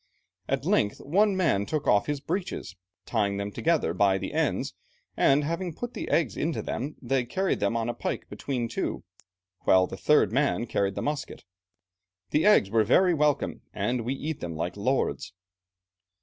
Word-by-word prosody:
At -, -, -1 dB
length 105 Hz, -, +2 dB
one 195 Hz, +6 st, +2 dB
man 115 Hz, -, +1 dB
took 150 Hz, -2 st, -2 dB
off 105 Hz, -1 st, +3 dB
his 145 Hz, -1 st, -1 dB
breeches, 170 Hz, -, -4 dB, 0.3 s
tying 100 Hz, -1 st, 0 dB
them 100 Hz, 0 st, -3 dB
together 160 Hz, -, +1 dB
by 95 Hz, +1 st, +3 dB
the -, -, -5 dB
ends, -, -, 0 dB, 0.4 s
and 140 Hz, +2 st, +4 dB
having 170 Hz, +2 st, -3 dB
put 245 Hz, 0 st, -5 dB
the -, -, -5 dB
eggs 165 Hz, -, +1 dB
into 160 Hz, +1 st, -2 dB
them, 145 Hz, +5 st, -4 dB
they 135 Hz, -2 st, 0 dB
carried 190 Hz, +10 st, -1 dB
them 105 Hz, +3 st, +1 dB
on 115 Hz, 0 st, -1 dB
a 120 Hz, -, -1 dB
pike -, -, -4 dB
between 125 Hz, -4 st, -3 dB
two, 115 Hz, -, -3 dB, 0.6 s
while 95 Hz, -1 st, +4 dB
the 95 Hz, -, -8 dB
third 150 Hz, -7 st, +3 dB
man 135 Hz, -1 st, +1 dB
carried 100 Hz, -4 st, -1 dB
the -, -, -3 dB
musket. 145 Hz, -1 st, -4 dB, 0.9 s
The 155 Hz, +7 st, +3 dB
eggs 105 Hz, -, +5 dB
were 110 Hz, -1 st, +4 dB
very 180 Hz, -, +4 dB
welcome, 150 Hz, -2 st, +1 dB
and 120 Hz, 0 st, 0 dB
we 125 Hz, +4 st, -2 dB
eat 150 Hz, +2 st, -4 dB
them 85 Hz, -2 st, -5 dB
like 85 Hz, +2 st, -3 dB
lords." 115 Hz, -1 st, -1 dB
135 Hz, 175 wpm, -27 LUFS, 100-155 Hz, 0.9 s, eggs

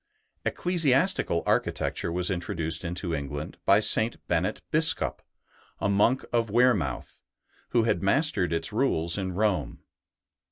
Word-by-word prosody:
Ecclesiastical 165 Hz, -, +1 dB
architecture -, -, -1 dB
was 90 Hz, +2 st, -1 dB
introduced 85 Hz, -2 st, -2 dB
into 85 Hz, 0 st, -3 dB
England 75 Hz, 0 st, -5 dB
by -, -, +6 dB
St. 110 Hz, +1 st, +3 dB
Bennet 90 Hz, +4 st, -1 dB
Biscop, 160 Hz, +1 st, +3 dB, 0.6 s
a -, -, -1 dB
monk 105 Hz, +6 st, +2 dB
of 115 Hz, -2 st, +1 dB
Wearmouth, 105 Hz, -, 0 dB, 0.5 s
who 120 Hz, -, +2 dB
had 110 Hz, -6 st, 0 dB
mastered 100 Hz, -, +1 dB
its 85 Hz, +6 st, -1 dB
rules 85 Hz, -9 st, +1 dB
in 95 Hz, -2 st, -3 dB
Rome. 105 Hz, 0 st, -1 dB
100 Hz, 120 wpm, -26 LUFS, 85-125 Hz, 0.6 s, by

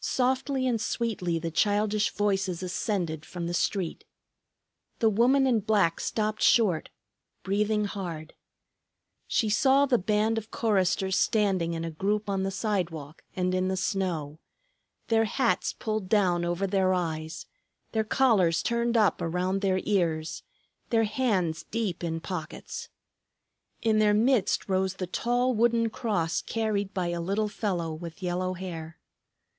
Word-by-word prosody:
Softly 260 Hz, +1 st, 0 dB
and 235 Hz, -4 st, +1 dB
sweetly 205 Hz, -8 st, -1 dB
the 165 Hz, 0 st, -3 dB
childish 210 Hz, +3 st, +2 dB
voices 195 Hz, -4 st, -1 dB
ascended 180 Hz, -4 st, -2 dB
from 175 Hz, -1 st, -6 dB
the 170 Hz, -, -3 dB
street. 180 Hz, 0 st, -1 dB, 0.9 s
The 225 Hz, -1 st, +3 dB
woman 255 Hz, +6 st, +4 dB
in 245 Hz, -4 st, +3 dB
black 200 Hz, -5 st, +2 dB
stopped 215 Hz, 0 st, -2 dB
short, 195 Hz, -9 st, +3 dB, 0.5 s
breathing 210 Hz, +2 st, +1 dB
hard. 170 Hz, -6 st, -6 dB, 0.9 s
She 220 Hz, -, +1 dB
saw 265 Hz, +6 st, +4 dB
the 255 Hz, -3 st, +2 dB
band 215 Hz, +3 st, +1 dB
of 220 Hz, 0 st, -13 dB
choristers 190 Hz, -3 st, +1 dB
standing 190 Hz, -6 st, +1 dB
in 165 Hz, 0 st, -3 dB
a 165 Hz, -, -4 dB
group 205 Hz, +6 st, -1 dB
on 195 Hz, -1 st, 0 dB
the 195 Hz, -, 0 dB
sidewalk 175 Hz, -7 st, -3 dB
and 185 Hz, -1 st, 0 dB
in 185 Hz, 0 st, +1 dB
the 190 Hz, 0 st, -1 dB
snow, 170 Hz, -7 st, -2 dB, 0.7 s
their 225 Hz, -1 st, +3 dB
hats 240 Hz, +2 st, +1 dB
pulled 215 Hz, -4 st, -3 dB
down 185 Hz, -5 st, +3 dB
over 175 Hz, +3 st, -1 dB
their 190 Hz, -1 st, +2 dB
eyes, 160 Hz, -2 st, -3 dB, 0.5 s
their 220 Hz, -1 st, +1 dB
collars 215 Hz, -8 st, +3 dB
turned 235 Hz, 0 st, +1 dB
up 210 Hz, -3 st, +3 dB
around 180 Hz, +3 st, -1 dB
their 190 Hz, -2 st, +1 dB
ears, 165 Hz, -6 st, 0 dB, 0.5 s
their 225 Hz, -2 st, +3 dB
hands 205 Hz, -8 st, 0 dB
deep 210 Hz, -7 st, -2 dB
in 165 Hz, -1 st, -2 dB
pockets. 170 Hz, -3 st, -6 dB, 0.9 s
In 220 Hz, -1 st, +3 dB
their 210 Hz, -1 st, +4 dB
midst 225 Hz, -2 st, +2 dB
rose 190 Hz, -1 st, 0 dB
the 185 Hz, -, -3 dB
tall 245 Hz, +7 st, 0 dB
wooden 230 Hz, 0 st, +2 dB
cross 170 Hz, -10 st, -1 dB
carried 210 Hz, -3 st, -1 dB
by 180 Hz, -3 st, -2 dB
a 175 Hz, 0 st, -2 dB
little 200 Hz, +5 st, 0 dB
fellow 175 Hz, -7 st, -2 dB
with 170 Hz, +3 st, -8 dB
yellow 180 Hz, +1 st, -1 dB
hair. 165 Hz, -3 st, -7 dB
195 Hz, 140 wpm, -28 LUFS, 175-220 Hz, 0.9 s, woman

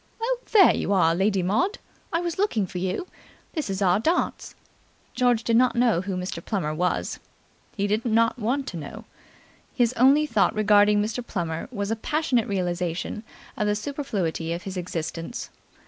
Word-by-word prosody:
"Oh, 485 Hz, +2 st, -1 dB
there 410 Hz, -4 st, +7 dB
you 200 Hz, -, -1 dB
are, 165 Hz, -4 st, +4 dB
Lady 190 Hz, +1 st, +1 dB
Maud! 350 Hz, -, +1 dB, 0.3 s
I 335 Hz, -, 0 dB
was 345 Hz, 0 st, -3 dB
looking 245 Hz, -, +1 dB
for 180 Hz, 0 st, -6 dB
you. 185 Hz, -, -2 dB, 0.5 s
This 310 Hz, -, -3 dB
is 195 Hz, +1 st, -1 dB
our 185 Hz, +1 st, +3 dB
dance." 325 Hz, +10 st, -1 dB, 0.6 s
George 245 Hz, -2 st, +2 dB
did 230 Hz, -, +1 dB
not 250 Hz, +1 st, +4 dB
know 235 Hz, -7 st, +3 dB
who 190 Hz, 0 st, -4 dB
Mr. 180 Hz, -2 st, -5 dB
Plummer 175 Hz, -8 st, -2 dB
was. 180 Hz, +3 st, -1 dB, 0.6 s
He 200 Hz, -, +1 dB
did 210 Hz, +2 st, 0 dB
not 230 Hz, +1 st, +2 dB
want 255 Hz, +5 st, 0 dB
to 175 Hz, -, -6 dB
know. 150 Hz, -3 st, -8 dB, 0.7 s
His 240 Hz, -1 st, +2 dB
only 275 Hz, +5 st, +5 dB
thought 215 Hz, -9 st, +2 dB
regarding 210 Hz, 0 st, +4 dB
Mr. 225 Hz, +3 st, -3 dB
Plummer 165 Hz, -7 st, -4 dB
was 200 Hz, -3 st, -3 dB
a -, -, +1 dB
passionate 250 Hz, -1 st, 0 dB
realization 180 Hz, 0 st, -2 dB, 0.3 s
of 210 Hz, -, -1 dB
the 210 Hz, -, +2 dB
superfluity 205 Hz, -, -3 dB
of 170 Hz, -, -5 dB
his 195 Hz, -1 st, -6 dB
existence. 165 Hz, +2 st, -5 dB
210 Hz, 170 wpm, -25 LUFS, 180-245 Hz, 0.7 s, there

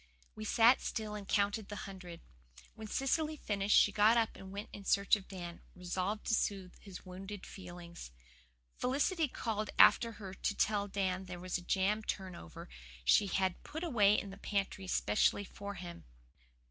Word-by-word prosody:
We 215 Hz, -, -7 dB
sat 235 Hz, +3 st, +5 dB
still 215 Hz, -2 st, -3 dB
and 205 Hz, -2 st, -6 dB
counted 205 Hz, 0 st, +1 dB
the 205 Hz, -, -5 dB
hundred. 185 Hz, -3 st, -9 dB, 0.5 s
When 220 Hz, -, -8 dB
Cecily 305 Hz, +6 st, 0 dB
finished 205 Hz, -4 st, +2 dB
she 205 Hz, -, +6 dB
got 215 Hz, +3 st, +5 dB
up 225 Hz, -1 st, +1 dB
and 190 Hz, 0 st, -10 dB
went 205 Hz, +2 st, -6 dB
in 200 Hz, -, -8 dB
search 200 Hz, +1 st, +4 dB
of 200 Hz, -3 st, -9 dB
Dan, 175 Hz, -3 st, -7 dB
resolved 185 Hz, +3 st, -3 dB
to -, -, 0 dB
soothe 195 Hz, -4 st, 0 dB
his 195 Hz, -2 st, -11 dB
wounded 190 Hz, +2 st, -8 dB
feelings. 175 Hz, -, -9 dB, 0.7 s
Felicity 295 Hz, +6 st, +1 dB
called 215 Hz, -4 st, -3 dB
after 230 Hz, +2 st, +7 dB
her 195 Hz, -3 st, -8 dB
to 205 Hz, +2 st, -2 dB
tell 205 Hz, -1 st, +1 dB
Dan 190 Hz, -1 st, -1 dB
there 180 Hz, -1 st, -7 dB
was 185 Hz, 0 st, -2 dB
a -, -, -11 dB
jam 195 Hz, +4 st, +1 dB
turnover 185 Hz, -, -6 dB, 0.4 s
she 200 Hz, -, +5 dB
had 190 Hz, -2 st, 0 dB
put 315 Hz, +3 st, -6 dB
away 210 Hz, -, +4 dB
in 200 Hz, -, -7 dB
the 195 Hz, -, -10 dB
pantry 195 Hz, -2 st, -2 dB
specially 105 Hz, -, +2 dB
for 200 Hz, +1 st, -7 dB
him. 175 Hz, -1 st, -8 dB
200 Hz, 170 wpm, -34 LUFS, 185-215 Hz, 0.7 s, after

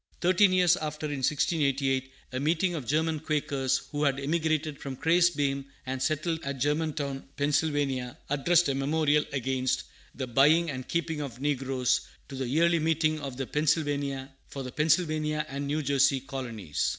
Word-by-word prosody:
Thirteen 185 Hz, +2 st, +4 dB
years 180 Hz, -1 st, +4 dB
after, 155 Hz, -1 st, -4 dB
in 145 Hz, -2 st, -3 dB
1688, 135 Hz, -2 st, +1 dB, 0.2 s
a 130 Hz, -, -3 dB
meeting 175 Hz, +5 st, +1 dB
of 145 Hz, -8 st, -5 dB
German 160 Hz, +1 st, +1 dB
Quakers, 140 Hz, -4 st, 0 dB
who 145 Hz, 0 st, -1 dB
had 140 Hz, -1 st, +2 dB
emigrated 155 Hz, 0 st, -1 dB
from 135 Hz, -2 st, -5 dB
Kriesbeim, 150 Hz, -4 st, +2 dB, 0.2 s
and 130 Hz, 0 st, -3 dB
settled 155 Hz, +3 st, 0 dB
at 140 Hz, 0 st, -3 dB
Germantown, 145 Hz, -1 st, -1 dB
Pennsylvania, 145 Hz, -4 st, 0 dB
addressed 165 Hz, +4 st, +3 dB
a 140 Hz, -, +1 dB
memorial 150 Hz, +2 st, +2 dB
against 130 Hz, -1 st, -1 dB, 0.3 s
"the 135 Hz, -, -3 dB
buying 150 Hz, +7 st, +4 dB
and 130 Hz, -1 st, -6 dB
keeping 165 Hz, -2 st, -1 dB
of 130 Hz, -4 st, -6 dB
negroes" 135 Hz, -3 st, 0 dB, 0.3 s
to 135 Hz, -, -7 dB
the 130 Hz, -1 st, -3 dB
Yearly 165 Hz, +5 st, +3 dB
Meeting 155 Hz, 0 st, +1 dB
for 140 Hz, -2 st, -4 dB
the 135 Hz, -1 st, -2 dB
Pennsylvania 155 Hz, -1 st, +1 dB
and 140 Hz, +1 st, -4 dB
New 150 Hz, +2 st, -1 dB
Jersey 140 Hz, 0 st, +3 dB
colonies. 115 Hz, -, -5 dB
145 Hz, 145 wpm, -28 LUFS, 135-155 Hz, 0.3 s, Thirteen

